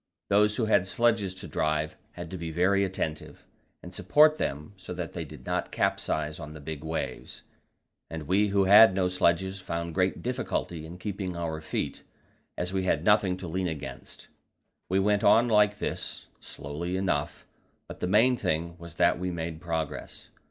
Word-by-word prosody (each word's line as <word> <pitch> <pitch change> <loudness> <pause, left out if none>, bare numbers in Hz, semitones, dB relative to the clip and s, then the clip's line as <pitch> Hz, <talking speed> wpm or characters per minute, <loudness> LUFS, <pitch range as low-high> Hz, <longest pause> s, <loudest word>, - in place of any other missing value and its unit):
Those 105 +1 +4
who 115 - 0
had 100 -4 +3
sledges 110 -4 +1
to 95 -1 -8
drive 75 -1 -1 0.2
had 85 -2 -8
to 95 - -5
be 85 -1 -4
very 95 +5 +2
attentive, 85 -5 -4 0.4
and 90 - -10
support 150 - +4
them 75 +7 -3
so 95 -1 -8
that 85 -2 -5
they 85 - -4
did 75 -4 -12
not - - -2
capsize 75 +1 -1
on 75 -1 -8
the 80 - -9
big 75 0 -7
waves, 80 +1 -5 0.7
and 80 -1 -5
we 95 +7 +2
who 100 -1 +2
had 100 +1 +8
no 95 -1 +2
sledges 95 +1 +1
found 85 -2 -4
great 95 +1 0
difficulty 115 -10 -3
in 85 +2 -9
keeping 95 -2 -4
our 80 -2 -3
feet, 75 - -3 0.6
as 90 +1 -3
we 95 -1 0
had 80 -2 +1
nothing 100 -3 +4
to 95 - -7
lean 90 +2 -1
against. 80 -4 -7 0.6
We 95 - +2
went 100 +1 +2
on 120 +2 +6
like 105 -2 +4
this, - - -4
slowly 85 +6 -5
enough, 85 -5 -2 0.4
but - - -9
the - - -1
main 115 +7 +4
thing 85 -5 -2
was 85 -1 -11
that - - +3
we 90 0 -2
made 80 -2 -5
progress. 80 -3 -4
90 Hz, 175 wpm, -28 LUFS, 80-100 Hz, 0.7 s, had